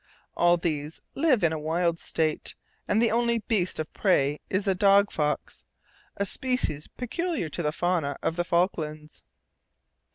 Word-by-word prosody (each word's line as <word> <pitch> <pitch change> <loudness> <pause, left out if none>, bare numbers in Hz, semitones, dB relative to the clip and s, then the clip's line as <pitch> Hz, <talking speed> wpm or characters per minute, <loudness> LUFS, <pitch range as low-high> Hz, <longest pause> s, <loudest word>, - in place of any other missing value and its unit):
All 175 0 +4
these 155 -2 -3
live 275 - +2
in 165 -1 +3
a 160 - -3
wild 165 +2 0
state, 155 -2 -1 0.3
and 210 - +2
the 230 0 +3
only 235 +1 +2
beast 205 -6 -1
of 155 - -4
prey 150 -7 +2
is 195 +2 0
the 195 - +3
dog 200 +2 +4
fox, 150 - -2 0.5
a 200 - 0
species 250 - -1
peculiar 310 - -3
to 170 - -4
the 150 -2 0
fauna 160 -4 -1
of 165 - 0
the 175 - 0
Falklands. 155 -4 -1
175 Hz, 155 wpm, -27 LUFS, 155-205 Hz, 0.5 s, All